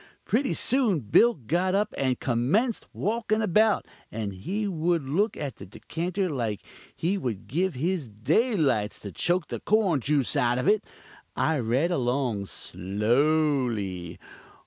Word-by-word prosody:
Pretty 260 +5 +1
soon 230 - +2
Bill 230 - +4
got 175 - 0
up 210 +1 0
and 130 -2 0
commenced 145 - 0
walkin' 220 +1 -1
about, 215 +1 +3 0.3
and 105 -3 -4
he 195 - -3
would 170 -4 0
look 200 +10 +1
at 135 -6 -5
the 100 - -9
dekanter 170 - -3
like 115 - -3 0.3
he 190 +4 0
would 115 - -4
give 170 - -1
his 165 +1 -1
daylights 135 - +1
to 100 - -7
choke 175 - 0
the - - -4
corn 205 -8 +2
juice 140 -1 0
out 120 0 +2
of 125 - -1
it. 210 +1 +4 0.5
I 160 -2 +1
read 130 +9 +1
along 125 - 0
slowly. 105 - 0
150 Hz, 140 wpm, -26 LUFS, 115-195 Hz, 0.5 s, Bill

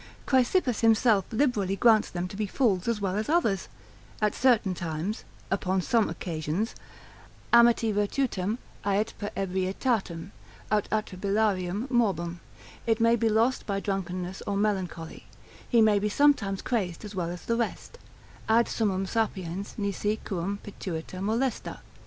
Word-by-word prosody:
Chrysippus 260 - +2
himself 225 -3 +4
liberally 220 -6 +1
grants 220 0 +4
them 175 0 -3
to 190 - -9
be 210 +1 -2
fools 195 -5 +1
as 230 -2 +1
well 195 -2 -1
as 215 +4 -2
others, 265 - +1 0.5
at 210 -1 +1
certain 230 -7 +3
times, 170 +4 -4 0.3
upon 190 -1 +1
some 220 +4 +2
occasions, 165 +5 -3 0.8
amitti 235 -2 +5
virtutem 205 -1 0 0.3
ait 205 +2 0
per 205 - -3
ebrietatem, 190 0 -1 0.4
aut 210 -1 +1
atribilarium 200 0 0
morbum, 175 -8 +1 0.5
it 225 0 +2
may 230 +1 +5
be 225 -1 +1
lost 225 +4 +1
by 200 -1 0
drunkenness 185 -2 -3
or 200 -1 0
melancholy, 185 -6 -2 0.4
he 235 -3 +5
may 210 -2 +4
be 210 +1 0
sometimes 205 -7 +2
crazed 195 -6 -2
as 210 - -8
well 175 -3 -2
as 175 0 -7
the 230 - +1
rest: 240 - -3 0.5
ad 230 +1 +4
summum 195 -4 0
sapiens 195 -3 -2
nisi 205 0 -1
quum 195 +1 -2
pituita 185 -3 -6
molesta. 230 +5 -1
205 Hz, 140 wpm, -27 LUFS, 185-225 Hz, 0.8 s, amitti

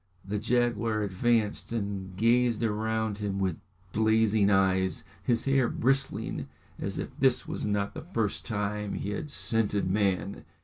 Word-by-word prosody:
The 105 +2 -2
jaguar 115 -1 +1
advanced 105 +3 0
and 100 -4 -4
gazed 120 +1 +3
around 110 -1 -1
him 100 -2 -2
with 95 -4 0 0.4
blazing 110 -1 +3
eyes, 95 -1 +2 0.2
his 115 +3 0
hair 135 -3 +3
bristling 135 +2 0 0.3
as - - -3
if - - -3
this - - +3
was - - -3
not 100 -1 -1
the - - -6
first - - -2
time 105 0 -2
he 100 - -3
had 150 +8 -4
scented 110 -7 +1
man. 100 -1 0
105 Hz, 140 wpm, -28 LUFS, 100-115 Hz, 0.4 s, gazed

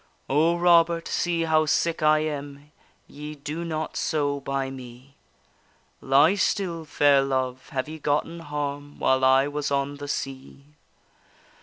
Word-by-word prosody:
O, 160 +5 +2
Robert, 170 -1 +4
see 170 -1 0
how 155 -1 +2
sick 165 +2 +1
I 155 0 +4
am! 145 -1 -6 0.3
Ye 150 +1 -9
do 150 +3 -5
not 160 -2 -4
so 145 -2 -1
by 135 -1 -3
me. 130 +1 -11 0.9
Lie 140 +6 +4
still, 185 -4 -1
fair 145 -2 +4
love, 130 -1 -2
have 130 0 -3
ye 160 +1 -8
gotten 150 +3 -1
harm 145 -2 -5
While 130 0 +2
I 130 +1 +5
was 145 0 -3
on 140 0 -1
the 145 0 -7
sea? 135 0 -6
145 Hz, 140 wpm, -25 LUFS, 140-160 Hz, 0.9 s, I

